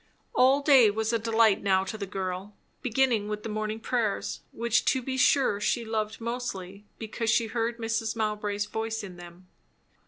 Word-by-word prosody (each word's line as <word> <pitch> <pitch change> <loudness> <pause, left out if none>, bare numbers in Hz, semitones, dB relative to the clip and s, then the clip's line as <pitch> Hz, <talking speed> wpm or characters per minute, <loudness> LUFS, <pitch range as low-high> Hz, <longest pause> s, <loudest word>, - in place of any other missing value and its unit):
All 265 +3 +4
day 265 -7 +7
was 220 +2 -1
a 230 - +2
delight 225 -2 +3
now 190 -1 +2
to 195 - -5
the 200 -2 -5
girl; 190 +1 -5 0.3
beginning 245 -4 +1
with 210 0 -4
the - - -5
morning 215 +1 -3
prayers, 225 -2 -1
which 235 0 +1
to 260 - +3
be 260 +1 -3
sure 260 -5 +3
she 230 +2 0
loved 215 -1 -2
mostly 210 -5 -5
because 225 +1 -3
she 225 +1 +3
heard 230 +1 -2
Mrs. 225 -1 -2
Mowbray's 210 -2 -1
voice 225 +1 -3
in 185 -3 -9
them. 175 +1 -13
220 Hz, 175 wpm, -27 LUFS, 205-230 Hz, 0.3 s, day